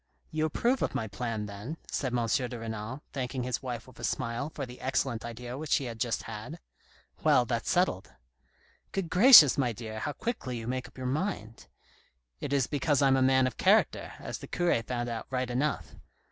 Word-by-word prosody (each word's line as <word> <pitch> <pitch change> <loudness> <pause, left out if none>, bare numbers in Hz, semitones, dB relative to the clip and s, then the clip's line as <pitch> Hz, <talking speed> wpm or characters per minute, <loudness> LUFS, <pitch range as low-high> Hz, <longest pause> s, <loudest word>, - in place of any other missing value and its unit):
"You 155 0 0
approve 240 - +1
of - - -1
my 110 - -1
plan, 110 +1 -3
then?" 105 +10 -7
said 130 -3 -1
M. 120 -1 0
de 120 +2 -1
Renal, 115 +4 -5
thanking 130 -1 -3
his 125 -1 -2
wife 120 -3 -5
with 130 -2 -17
a - - -9
smile 115 +5 -2
for 145 -3 -5
the 125 0 -12
excellent 130 -2 -1
idea 120 +2 -6
which 155 -1 -6
she 140 - +3
had 115 -3 -6
just 115 -1 -1
had. 115 +9 -7 0.3
" - - -30
Well, 125 - +5
that's 120 -2 -2
settled." 175 - +1 0.4
" - - -35
Good 185 -4 -2
gracious, 180 - +9
my 125 -3 +1
dear, 110 0 -7
how 145 - -3
quickly 140 - -4
you 115 - -6
make 130 +2 -3
up - - -20
your 130 - -5
mind! 130 - -3 0.2
" - - -32
" - - -50
It - - -4
is 140 -3 +2
because 145 0 +1
I'm 135 -1 +5
a 135 - +2
man 130 0 +4
of 130 - -3
character, - - +3
as - - -6
the - - -9
cure 175 -9 +1
found 120 +1 -3
out 115 -1 -5
right 130 -1 -2
enough. 140 +4 -1
125 Hz, 215 wpm, -29 LUFS, 115-140 Hz, 0.4 s, gracious